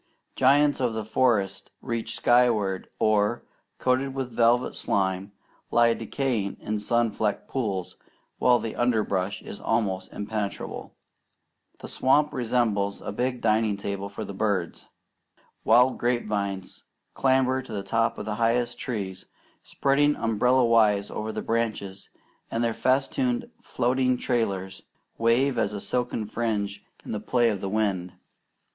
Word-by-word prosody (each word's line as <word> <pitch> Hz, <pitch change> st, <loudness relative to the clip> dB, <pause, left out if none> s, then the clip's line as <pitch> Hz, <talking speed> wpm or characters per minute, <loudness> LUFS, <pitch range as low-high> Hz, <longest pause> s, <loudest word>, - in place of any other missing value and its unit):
Giants 145 Hz, +2 st, +4 dB
of 125 Hz, -3 st, 0 dB
the 110 Hz, -1 st, -3 dB
forest 110 Hz, -5 st, +1 dB
reach 115 Hz, -2 st, -3 dB
skyward, 115 Hz, -6 st, +2 dB
or, 110 Hz, +2 st, +2 dB, 0.3 s
coated 130 Hz, +1 st, 0 dB
with 130 Hz, -2 st, -3 dB
velvet 120 Hz, +2 st, +2 dB
slime, 95 Hz, 0 st, -1 dB, 0.4 s
lie 120 Hz, 0 st, +4 dB
decaying 115 Hz, -3 st, -2 dB
in 105 Hz, 0 st, -3 dB
sun 115 Hz, +2 st, +1 dB
flecked 105 Hz, -1 st, -2 dB
pools, 100 Hz, -9 st, -3 dB, 0.4 s
while 125 Hz, -1 st, +5 dB
the 115 Hz, -2 st, -5 dB
underbrush 105 Hz, -5 st, 0 dB
is -, -, -8 dB
almost 100 Hz, -5 st, -1 dB
impenetrable. 105 Hz, -1 st, -5 dB, 0.8 s
The -, -, -9 dB
swamp 145 Hz, +3 st, +2 dB
resembles 110 Hz, -6 st, 0 dB
a -, -, -4 dB
big 125 Hz, +3 st, -2 dB
dining 110 Hz, -2 st, +2 dB
table 100 Hz, 0 st, -4 dB
for 100 Hz, -, -6 dB
the 100 Hz, -, -7 dB
birds. 95 Hz, -4 st, -2 dB, 0.8 s
Wild 125 Hz, +3 st, +4 dB
grape 120 Hz, 0 st, 0 dB
vines 100 Hz, -3 st, -3 dB, 0.3 s
clamber 130 Hz, -1 st, +2 dB
to 130 Hz, -, -12 dB
the 100 Hz, -2 st, -3 dB
tops 115 Hz, +3 st, 0 dB
of -, -, -5 dB
the 110 Hz, -, -2 dB
highest 120 Hz, +1 st, +1 dB
trees, 95 Hz, -6 st, -5 dB, 0.3 s
spreading 145 Hz, +2 st, +2 dB
umbrella 120 Hz, +3 st, +2 dB
wise 105 Hz, -3 st, +3 dB
over 110 Hz, +1 st, -4 dB
the -, -, -4 dB
branches, 110 Hz, -4 st, -2 dB, 0.4 s
and 115 Hz, -, -1 dB
their 115 Hz, -1 st, +1 dB
festooned 240 Hz, -, 0 dB
floating 125 Hz, +1 st, +1 dB
trailers 100 Hz, -7 st, -2 dB, 0.4 s
wave 120 Hz, +3 st, +2 dB
as 105 Hz, -2 st, -2 dB
silken 120 Hz, -3 st, -1 dB
fringe 105 Hz, -2 st, -2 dB, 0.2 s
in -, -, -6 dB
the 105 Hz, -, -2 dB
play 120 Hz, +2 st, +2 dB
of 100 Hz, -, -4 dB
the 95 Hz, -, -3 dB
wind. 95 Hz, -4 st, -1 dB
115 Hz, 135 wpm, -26 LUFS, 100-125 Hz, 0.8 s, while